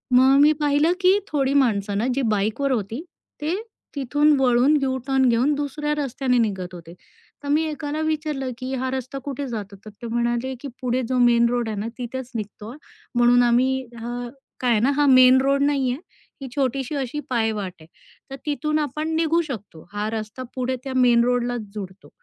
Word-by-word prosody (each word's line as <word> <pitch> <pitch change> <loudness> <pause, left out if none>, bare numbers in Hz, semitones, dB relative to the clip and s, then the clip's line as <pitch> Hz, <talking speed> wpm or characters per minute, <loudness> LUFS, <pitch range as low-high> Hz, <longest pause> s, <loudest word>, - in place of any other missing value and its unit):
मग 265 +2 +6
मी 300 +1 +7
पाहिलं 295 +4 +3
की 375 +2 +5
थोडी 275 -2 0
माणसं 205 -7 +2
ना 230 +4 0
जी 275 - 0
बाईकवर 220 +7 0
होती, 225 +3 -2 0.4
ते 320 +5 0 0.4
तिथून 290 +3 +2
वळून 255 +3 +4
यू-टर्न 265 0 +1
घेऊन 250 +6 +2
दुसऱ्या 295 +1 -2
रस्त्याने 265 -2 0
निघत 190 -5 -1
होते. 170 -1 -10 0.5
तर - - -6
मी 305 +2 +3
एकाला 300 0 -4
विचारलं, 305 -4 -2
की 255 +2 -5
"हा 260 0 -2
रस्ता 265 +1 -4
कुठे 280 0 -4
जातो?" 210 -4 -6
तर - - -8
ते 235 - -5
म्हणाले, 240 +2 -1
की 280 - -7
"पुढे 250 +1 0
जो 255 - +1
मेन 235 -1 +5
रोड 240 -2 -1
आहे 215 - -4
ना, 220 - -3
तिथेच 250 +1 -6
निघतो, 210 +2 -6 0.4
म्हणून 240 0 +5
आम्ही 260 +2 +2 0.2
हां. 240 +1 -5 0.3
काय 250 -1 +1
आहे 220 - +3
ना, 270 +4 +3
हा 290 - +4
मेन 255 0 +7
रोड 275 +1 +2
नाहीये, 270 -3 +1 0.5
ही 270 - -5
छोटीशी 270 +1 -1
अशी 275 +1 -3
पायवाट 220 -6 -1
आहे, - - -13 0.5
तर - - -4
तिथून 305 +1 0
आपण 305 +2 -2
निघू 330 +1 +2
शकतो. 205 - -8
हा 210 +1 -2
रस्ता 220 +3 -5
पुढे 255 0 -1
त्या 265 -1 -5
मेन 240 -2 +5
रोडलाच 245 -1 0
जोडतो." 190 -1 -8
255 Hz, 180 wpm, -23 LUFS, 235-280 Hz, 0.5 s, मी